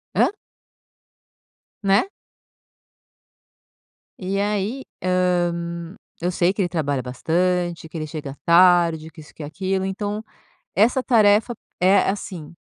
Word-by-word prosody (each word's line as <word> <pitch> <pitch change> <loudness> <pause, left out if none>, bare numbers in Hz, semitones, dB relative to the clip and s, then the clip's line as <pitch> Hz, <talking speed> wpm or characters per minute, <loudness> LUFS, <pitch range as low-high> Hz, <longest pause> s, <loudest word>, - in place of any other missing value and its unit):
hã? - - +5 1.6
Né. 195 - +4 2.1
E 195 +1 -2
aí, 210 +5 -1 0.2
hã, 175 -1 0 0.3
eu 180 +2 0
sei 175 +2 +2
que 200 - -2
ele 180 - 0
trabalha 145 -5 -1
bastante, 170 +6 -1
que 165 - -7
ele 155 - -3
chega 150 -3 -7
tarde, 170 -2 +4
que 160 - -16
isso 150 - -16
que - - -11
aquilo. 190 +5 -2
Então, 205 +2 -3 0.5
essa 245 +5 +3
tarefa 220 -1 +4
é - - -24 0.2
é 195 0 +4
assim, 180 -5 -5
180 Hz, 120 wpm, -22 LUFS, 165-200 Hz, 2.1 s, hã